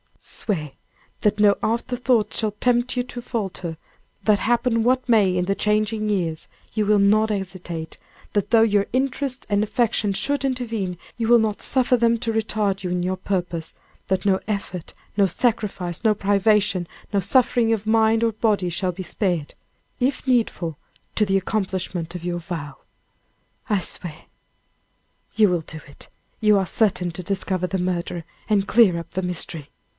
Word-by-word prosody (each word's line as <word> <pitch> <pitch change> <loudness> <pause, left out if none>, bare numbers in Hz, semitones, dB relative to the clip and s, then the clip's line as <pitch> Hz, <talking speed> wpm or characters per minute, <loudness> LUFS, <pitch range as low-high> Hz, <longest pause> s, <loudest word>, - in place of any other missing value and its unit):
"Swear 155 -9 -4 0.5
that 210 0 +1
no 205 -1 +5
afterthoughts 235 0 0
shall 215 -2 0
tempt 240 +4 +1
you - - +3
to 245 0 -7
falter; 190 -8 -4 0.5
that 210 -2 +3
happen 235 0 +1
what 255 +2 +2
may 205 -6 +4
in 180 0 +1
the 195 +1 0
changing 215 +1 0
years, 170 -6 -1 0.3
you 215 -1 +1
will 210 0 +4
not 215 +2 +4
hesitate; 180 -5 -5 0.4
that 205 -2 0
though 230 -1 +6
your 205 -2 +3
interests 265 0 -1
and 205 0 +2
affections 215 -3 +1
should 285 -1 0
intervene, 225 -8 -2 0.2
you 230 -1 -1
will 240 0 +7
not 215 -2 -1
suffer 255 -1 +3
them 235 0 +3
to 225 0 -2
retard 210 -3 -1
you 180 - -2
in 180 0 -1
your 185 +1 0
purpose; 175 -4 -3 0.3
that 190 0 0
no 190 -1 +3
effort, 195 -5 -4 0.2
no 200 - +5
sacrifice, 195 -4 -1
no 220 -2 +4
privation, 200 -2 +2 0.3
no 200 - +3
suffering 240 +2 +3
of 215 -1 -3
mind 225 0 +3
or 230 - +3
body 210 -4 +1
shall 180 +2 -1
be 185 +2 -7
spared, 175 -4 -2 0.5
if 265 +1 -1
needful, 220 - 0 0.4
to 210 - +3
the 195 -1 +2
accomplishment 185 -4 -2
of 175 - -6
your 175 0 -2
vow." 160 -5 -6 0.9
"I 205 -2 +3
swear." 165 -2 -4 1.1
"You 215 -2 +5
will 175 -2 +1
do 160 0 -8
it! 140 - -13 0.3
You 210 -2 +4
are 190 - 0
certain 180 -5 +1
to 185 +2 -6
discover 190 -1 0
the 190 +1 -2
murderer, 175 -1 -2 0.3
and 200 -2 +2
clear 200 -7 +5
up 170 - -10
the 185 - -2
mystery." 165 -4 -4
205 Hz, 165 wpm, -23 LUFS, 180-225 Hz, 1.1 s, will